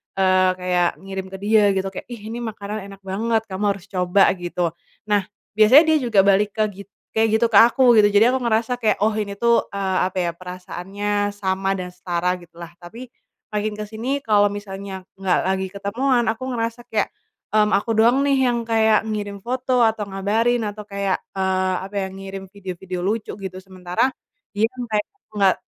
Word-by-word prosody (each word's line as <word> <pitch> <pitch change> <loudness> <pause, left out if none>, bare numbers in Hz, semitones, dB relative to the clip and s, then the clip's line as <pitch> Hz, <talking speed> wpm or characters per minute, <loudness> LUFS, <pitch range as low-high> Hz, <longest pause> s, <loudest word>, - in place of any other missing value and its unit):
eee, 185 -1 +3
kayak 180 -1 +1 0.2
ngirim 195 -1 -5
ke 190 - -7
dia 215 0 +4
gitu 190 0 -1
kayak, - - -8
"ih 235 -3 -8
ini 235 - -5
makanan 210 -2 -5
enak 195 -1 -12
banget, 220 +4 0
kamu 190 +2 -3
harus 195 -2 -13
coba" 180 +1 +3
gitu. 175 -1 -2 0.3
Nah, 210 -1 +2 0.3
biasanya 220 +8 +7
dia - - +5
juga 220 -4 +3
balik 200 +1 +2
ke 215 - +2
gi 200 +1 -10 0.3
kayak 220 0 +3
gitu 235 - +2
ke - - +6
aku 240 +1 +5
gitu, 205 - +6
jadi 210 +4 +5
aku 260 - 0
ngerasa 230 0 +1
kayak, 220 - +2
oh 220 - +3
ini 210 -2 -3
tuh, 235 +2 +2
eee, 190 -2 0
apa 190 - -10
ya, 170 - 0
perasaannya 190 +3 -3
sama 195 -1 -1
dan 180 -1 -6
setara 180 0 -1
gitu 175 - -18
lah. 170 -1 -9
Tapi, 225 +9 -9 0.5
makin 210 0 -2
ke 210 - -4
sini, 225 +6 -3
kalau 205 -2 +4
misalnya 195 -2 -7
nggak 190 -2 0
lagi 190 0 0
ketemuan 235 +6 0
aku 235 +4 -2
ngerasa 230 -1 -3
kayak, 215 -3 -1 0.4
mmm, 210 -1 +4
aku 215 +2 +1
doang 240 +5 +4
nih 270 -2 +3
yang 235 -1 -1
kayak 220 -1 +3
ngirim 205 -2 -5
foto, 250 0 +1
atau 215 -2 -1
ngabarin, 220 +5 +1
atau 210 0 -5
kayak, 200 -1 -1 0.2
eee, 190 0 +1
apa 200 +1 -11
ya, 190 - -2
ngirim 195 0 -8
video-video 185 -2 -6
lucu 215 +1 -2
gitu, 190 -2 -7
sementara, 185 +4 -1 0.5
dia 215 - +4
kan 250 -1 -5
kayak 210 - -1 0.3
nggak, 195 -2 +4
205 Hz, 185 wpm, -22 LUFS, 190-225 Hz, 0.5 s, biasanya